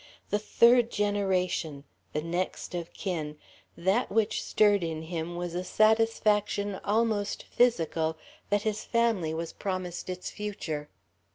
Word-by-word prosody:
The 205 - +2
third 235 +2 +5
generation; 190 -8 0 0.3
the 150 - -2
next 175 +2 -3
of 170 -1 -4
kin, 155 -6 -4 0.4
that 190 +8 +1
which 220 0 +1
stirred 205 -3 +3
in 160 -1 -3
him 165 +1 -4
was 175 -1 -4
a 180 +1 -2
satisfaction 210 -1 +2
almost 210 -1 0
physical 165 -9 +2 0.3
that 205 0 +2
his 215 -1 -1
family 230 -9 +1
was 165 +1 -4
promised 185 -3 -4
its 180 0 -4
future. 160 -8 -4
190 Hz, 125 wpm, -29 LUFS, 170-210 Hz, 0.4 s, third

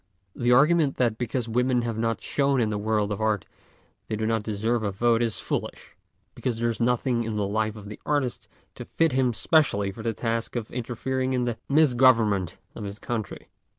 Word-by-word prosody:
The 120 0 +1
argument 150 +3 +4
that 115 -3 +1
because 120 0 -2
women 125 +1 +1
have 115 -1 -2
not 115 0 -1
shone 140 -2 +1
in 110 -3 +1
the 105 - -2
world 105 -1 0
of 105 - -3
art 110 -3 0 0.6
they 110 - -2
do 110 +1 -2
not 110 0 +1
deserve 110 +2 -1
a 105 - -1
vote 115 +4 +2
is 115 -2 -1
foolish, - - -4 0.4
because 120 -3 -3
there 120 +1 0
is 115 - -6
nothing 120 0 +1
in 110 -1 -3
the 105 -1 0
life 110 +2 -1
of 105 -1 -10
the 105 - -9
artist 145 -4 -1 0.3
to - - -8
fit 165 -1 +1
him 130 -1 +2
specially 110 -7 +2
for 105 - -9
the 115 0 -1
task 115 +1 -2
of 115 -3 -4
interfering 130 +2 -2
in 125 -1 +1
the 120 -2 -2
misgovernment 120 - +4 0.2
of - - -7
his 100 0 -6
country. 110 -2 -5
115 Hz, 200 wpm, -26 LUFS, 110-125 Hz, 0.6 s, argument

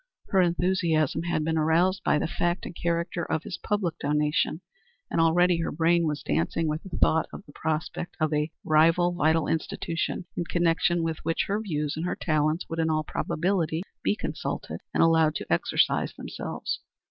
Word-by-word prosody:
Her 190 -3 +4
enthusiasm 170 -4 +1
had 170 -2 -1
been 160 +1 0
aroused 175 +4 +2
by - - +3
the - - 0
fact 175 +2 -1
and 175 - -7
character 170 +1 -1
of 160 - -2
his - - -6
public 185 -6 -1
donation, 150 +2 0 0.5
and - - +2
already 175 +2 +4
her 165 - -1
brain 170 0 +2
was 150 -1 -3
dancing 85 - 0
with 155 +1 -1
the 190 -3 -7
thought 160 0 +3
of - - -9
the 145 - -14
prospect 160 +3 -3
of 155 -1 +1
a 150 +1 +1 0.2
rival 165 +3 +4
vital 160 -2 +2
institution 165 +2 -2
in 170 - -2
connection 170 0 +2
with 165 -1 -2
which 165 +1 -1
her 205 +2 -1
views 150 -8 -2
and 165 +3 -2
her - - -1
talents 155 +1 0
would 165 - -4
in 160 0 +2
all 155 -1 +1
probability 170 +1 -1 0.2
be - - +2
consulted - - -4
and - - +3
allowed 160 -2 +4
to - - -2
exercise 85 - +1
themselves. - - -5
165 Hz, 180 wpm, -27 LUFS, 155-175 Hz, 0.5 s, Her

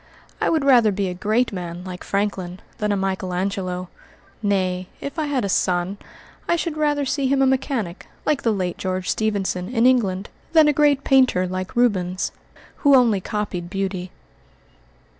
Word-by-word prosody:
I - - +2
would 315 -4 +1
rather 240 -6 +6
be 195 -1 -1
a - - -3
great 215 +6 0
man 175 -1 -5
like 180 -1 -7
Franklin 195 -3 -2 0.2
than 210 -1 0
a 200 - +1
Michael 190 -1 -2
Angelo 185 -1 -2 0.5
nay, 185 -3 0
if 280 +3 -5
I 305 - 0
had 270 -6 0
a - - 0
son, 185 +1 0 0.5
I 340 - +3
should 335 -1 -2
rather 295 -2 +1
see 270 0 0
him 275 +1 +2
a 270 - +5
mechanic, 260 - -1 0.2
like 295 -2 +1
the 230 - +2
late 185 -4 -2
George 185 -1 -2
Stephenson, 200 -4 -1
in 235 -1 +2
England, 210 -7 +2 0.2
than 315 -2 +7
a 295 - +4
great 290 -1 +3
painter 255 -9 +4
like 185 +4 -4
Rubens, 185 -7 +1 0.5
who 285 -2 +5
only 230 -6 +4
copied 200 -5 -3
beauty." 190 -1 -3
200 Hz, 170 wpm, -22 LUFS, 185-260 Hz, 0.5 s, than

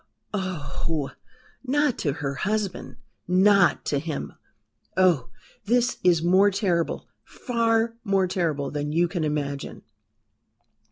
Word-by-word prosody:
oh! 160 -6 -3 0.5
not 285 0 +1
to 145 -5 0
her 140 -1 -3
husband? 200 +5 -2 0.3
Not 190 +1 +4
to 145 - 0
him! 155 0 -5 0.6
oh! 175 -9 +3 0.4
this 245 +3 +1
is 170 -3 +4
more 190 +4 +5
terrible 185 -4 -1 0.2
far 230 -2 0
more 195 -3 +2
terrible 160 -6 -1
than 150 0 -3
you 170 +3 +2
can 170 -1 -3
imagine." 145 -2 -3
180 Hz, 110 wpm, -25 LUFS, 150-205 Hz, 0.6 s, more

